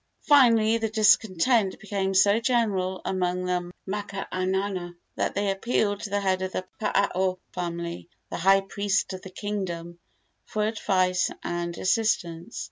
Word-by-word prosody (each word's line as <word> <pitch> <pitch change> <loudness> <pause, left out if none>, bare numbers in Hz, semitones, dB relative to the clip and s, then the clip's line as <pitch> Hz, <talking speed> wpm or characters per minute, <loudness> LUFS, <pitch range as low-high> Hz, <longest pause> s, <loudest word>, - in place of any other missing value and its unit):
Finally 230 -6 +5
the 225 0 -1
discontent 210 0 +3
became 195 -2 -2
so 200 +3 +5
general 210 -6 0
among 180 -1 -1
the 180 -1 -2 0.2
makaainana 190 -2 -3 0.2
that - - -1
they 200 0 +1
appealed 205 0 0
to 205 - -5
the 205 +1 0
head 190 -1 +1
of 185 0 -3
the 185 - -3 0.2
Paao 190 -3 +1 0.2
family, 170 -1 -4 0.2
the - - -3
high 195 +3 +5
priest 200 0 -1
of 185 - -7
the 190 - -9
kingdom, 180 -4 -5 0.4
for 215 - -2
advice 185 -4 +1
and 170 0 -3
assistance. 185 -3 0
195 Hz, 135 wpm, -26 LUFS, 180-210 Hz, 0.4 s, Finally